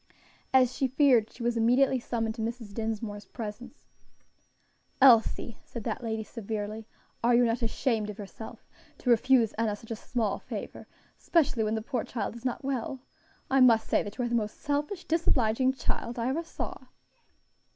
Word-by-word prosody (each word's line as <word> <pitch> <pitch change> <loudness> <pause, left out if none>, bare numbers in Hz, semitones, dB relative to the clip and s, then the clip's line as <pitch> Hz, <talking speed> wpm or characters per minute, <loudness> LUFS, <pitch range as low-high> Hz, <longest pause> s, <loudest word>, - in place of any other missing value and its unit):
As 255 -1 +5
she 270 - +1
feared, 255 -4 +4
she 240 - -9
was 240 0 +1
immediately 250 +3 +3
summoned 225 -2 -2
to 220 - -6
Mrs. 225 -2 -4
Dinsmore's 215 -2 -4
presence. 235 +4 -8 1.1
"Elsie," 235 -3 +5
said 235 - -7
that 250 - -3
lady, 220 -1 -2
severely, 215 0 -5 0.4
"are 240 +1 +5
you 245 0 +5
not 230 +1 0
ashamed 225 -2 0
of 210 - -7
yourself, 210 +1 -9 0.3
to 250 - +1
refuse 235 -1 +4
Enna 220 -2 +1
such 225 +2 -13
a - - -1
small 220 -2 -2
favor - - -7 0.3
especially 275 -9 +2
when 215 +1 0
the 220 - -3
poor 245 0 -2
child 220 -2 -4
is 235 - -10
not 255 +1 -2
well. 265 -1 -2 0.5
I 270 - +5
must 235 -3 +6
say - - +3
you 215 +4 -4
are - - 0
the 240 - -3
most 215 -3 -1
selfish, 295 +5 -2
disobliging 260 -6 +2
child 245 -2 -3
I 235 +1 0
ever 315 +6 -1
saw." 330 - -6
235 Hz, 170 wpm, -29 LUFS, 220-255 Hz, 1.1 s, must